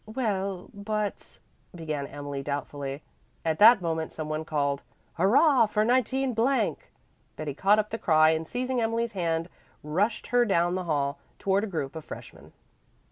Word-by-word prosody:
"Well, 200 -5 -2
but 210 0 -4 0.2
" - - -22
began 155 -4 -4
Emily 145 -1 -6
doubtfully. 140 0 -4 0.4
At 160 -1 0
that 215 -2 +8
moment 160 -1 -2
some 155 -1 -5
one 155 +1 -3
called, 140 -3 -1 0.3
"Hurrah 235 - +4
for 210 0 +1
19 255 +2 +1
!" 250 +5 -2
Betty 150 -2 -4
caught 195 +8 +3
up 210 0 -1
the 225 - -3
cry 155 -1 +5
and 160 0 -2
seizing 250 +2 -1
Emily's 230 +1 0
hand 165 -4 -1 0.4
rushed 190 +9 -1
her 245 0 +5
down 175 -5 +2
the 185 -1 -2
hall, 140 -3 -1 0.2
toward 195 +1 +1
a - - -2
group 160 -6 -4
of 160 - -6
freshmen. - - -11
180 Hz, 160 wpm, -27 LUFS, 155-220 Hz, 0.4 s, that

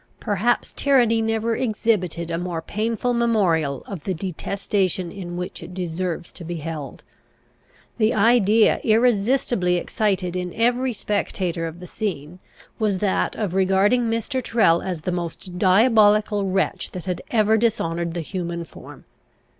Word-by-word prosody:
Perhaps 210 +4 0
tyranny 240 -5 +3
never 225 +1 0
exhibited 210 -8 -1
a 165 - -1
more 175 -2 -3
painful 230 +5 -1
memorial 180 - +1
of 190 -7 -7
the 190 - -2
detestation 185 0 -2
in 175 -2 -7
which 180 0 -5
it 175 +2 -9
deserves 175 -1 -3
to 175 - -10
be 170 +1 -5
held. 155 -3 -6 1.0
The 215 0 +3
idea 220 0 +4
irresistibly 225 -4 +2
excited 185 -1 -1
in 180 -1 -4
every 245 +3 +1
spectator 185 -5 -2
of 165 +2 -9
the 180 - -9
scene, 180 -4 -5 0.4
was 210 -3 +1
that 195 0 0
of 205 -5 -2
regarding 195 +5 +3
Mr. 230 +3 -2
Tyrrel 195 -9 +3
as 180 -4 -4
the 180 - -2
most 175 +1 -5
diabolical 210 0 +4
wretch 190 +1 -1
that 180 -1 -6
had 180 -2 -3
ever 220 -1 +3
dishonoured 170 -7 0
the 170 - -2
human 170 0 -4
form. - - -13
195 Hz, 140 wpm, -23 LUFS, 175-220 Hz, 1.0 s, idea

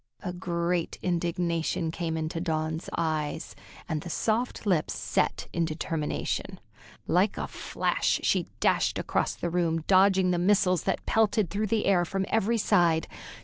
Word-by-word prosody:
A 180 - -3
great 175 -1 -1
indignation 170 -2 -1
came 165 -1 -3
into 160 +1 -3
Dawn's 160 -1 -2
eyes, 155 -1 -2 0.3
and 155 -3 -2
the 175 - -7
soft 225 +7 -1
lips 180 -6 +1
set - - -1
in 170 - +1
determination. 160 -1 -3 0.5
Like - - +2
a - - -3
flash - - -1
she - - +1
dashed - - +2
across - - -1
the 170 - -3
room, 165 -2 0
dodging 190 -1 +4
the 175 - +1
missiles 185 -2 +3
that - - -1
pelted 215 -4 +2
through 210 +1 -1
the 220 +1 0
air 185 -3 +4
from 195 +3 -2
every 225 +1 +2
side. 170 -6 +3
175 Hz, 145 wpm, -28 LUFS, 160-190 Hz, 0.5 s, dodging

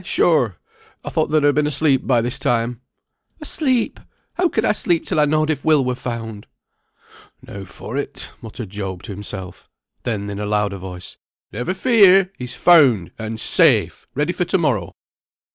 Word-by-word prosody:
sure! 130 - +2 0.5
I - - -4
thought - - 0
thou'd 155 -1 +2
ha' 145 0 +4
been 150 0 +1
asleep 140 -2 +1
by 120 -3 +3
this 120 +1 -2
time." 120 0 -1 0.6
"Asleep! 270 -6 0 0.3
How 360 -1 +1
could 220 -6 0
I - - +4
sleep 175 -5 0
till - - 0
I 150 - +5
knowed 155 +1 +1
if 145 -3 -3
Will 155 -4 +3
were 125 - 0
found?" 115 -4 -6 1.0
"Now 100 0 -9
for - - -7
it," - - -5
muttered 110 -2 -8
Job 95 -3 -5
to - - -7
himself. 95 -2 -7 0.3
Then 105 -4 -3
in 100 0 -5
a 105 - -3
louder 105 -1 0
voice, 90 -1 -9 0.3
"Never 125 +10 -3
fear! 195 -4 +5
he's 125 0 -5
found, 135 - +5
and 110 0 -5
safe, - - +2
ready 150 +5 0
for 180 - -1
to 190 - +1
morrow." 125 - -1
125 Hz, 170 wpm, -20 LUFS, 105-160 Hz, 1.0 s, I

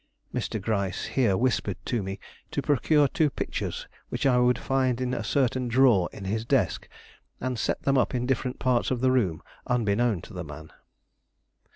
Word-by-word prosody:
Mr. 110 - -2
Gryce 100 -3 -1
here 115 -8 +3
whispered 105 -5 0 0.2
me 95 -4 -2 0.3
to - - -2
procure 145 +1 +3
two 155 +2 +1
pictures - - -4 0.2
which - - -3
I 125 -2 +4
would 125 0 +3
find 130 -2 0
in 125 0 -1
a 115 - -2
certain 130 +1 +1
drawer 120 -7 +4
in 100 - -9
his 110 +3 -1
desk, 115 - 0 0.5
and 125 -2 -2
set - - -1
them 135 -1 +3
up 120 0 0
in 125 0 0
different 130 0 -1
parts 125 -2 +1
of 125 -2 -1
the 130 0 +4
room 95 -12 +1 0.2
unbeknown 115 -4 +1
to - - -12
the 90 -2 -5
man. 80 0 -10
120 Hz, 175 wpm, -27 LUFS, 100-130 Hz, 0.5 s, I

